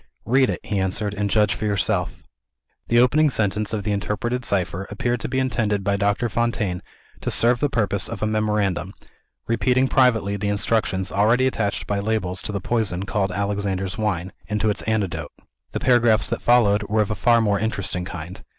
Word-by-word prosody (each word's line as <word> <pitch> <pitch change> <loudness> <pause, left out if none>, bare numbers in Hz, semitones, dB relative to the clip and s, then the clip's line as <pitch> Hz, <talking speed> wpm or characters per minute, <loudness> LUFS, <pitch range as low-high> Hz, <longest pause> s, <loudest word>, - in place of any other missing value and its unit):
"Read 130 +3 +3
it," - - -2
he 105 -2 -2
answered; 95 +2 -1
"and 105 0 -2
judge 105 0 +3
for 110 - -4
yourself." 100 -2 -1 0.6
The 120 - +2
opening 145 +6 +4
sentence 105 -3 0
of 105 -2 -2
the 105 - -1
interpreted 110 +5 -2
cipher 95 -2 -1
appeared 120 +4 -1
to - - -4
be 130 - -2
intended 105 -6 0
by 100 0 +1
Doctor 100 +4 +1
Fontaine 110 -5 -1 0.4
to - - -3
serve 120 +1 +3
the 145 - +1
purpose 100 -6 0
of 115 -2 -5
a - - +3
memorandum; 105 -4 -1 0.5
repeating 125 +3 +2
privately 115 -7 +2
the 100 0 -2
instructions 100 -2 0
already 115 +6 +3
attached 110 -6 -1
by 100 -1 -1
labels 100 -3 -1
to - - -5
the 100 - -2
poison 95 -3 -1
called 100 -1 -1
"Alexander's 100 -1 -2
Wine," 95 -4 -2 0.2
and 105 0 -1
to 110 0 +2
its - - -3
antidote. 95 -9 -1 0.4
The - - -3
paragraphs 120 -4 +3
that 115 - -3
followed 110 -4 +4
were 110 +1 +2
of 105 - -5
a - - +2
far 115 +4 +3
more 105 -3 +1
interesting 100 -4 -2
kind. 90 +1 -8
105 Hz, 185 wpm, -22 LUFS, 100-115 Hz, 0.6 s, opening